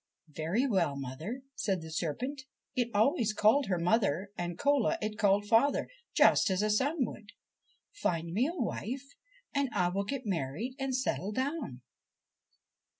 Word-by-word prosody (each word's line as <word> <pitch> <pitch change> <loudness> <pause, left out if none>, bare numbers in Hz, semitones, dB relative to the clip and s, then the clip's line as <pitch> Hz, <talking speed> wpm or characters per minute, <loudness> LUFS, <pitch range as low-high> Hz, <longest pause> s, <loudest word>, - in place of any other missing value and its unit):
'Very 165 - 0
well, 185 - +1
mother,' 155 - -5
said 195 -8 -1
the 160 - -8
serpent 250 - -3 0.3
it 245 -2 +1
always 225 - +2
called 225 +7 +4
her 185 -2 +1
mother, 195 0 +1
and 175 -2 -4
Cola 285 -3 +2
it 215 0 -3
called 205 -1 +3
father, 230 +7 +3 0.3
just - - +5
as 190 +2 +1
a 215 - +2
son 270 +6 +2
would. 210 -1 -10 0.3
' - - -40
Find 165 -1 0
me 235 +8 +2
a 340 +1 -5
wife 260 +3 -3 0.4
and 280 -2 +1
I 175 -1 +2
will 200 +2 -1
get 265 +3 -4
married 185 - -2
and 270 -1 -1
settle 250 -6 -1
down.' 260 - -3
215 Hz, 155 wpm, -31 LUFS, 180-260 Hz, 0.4 s, just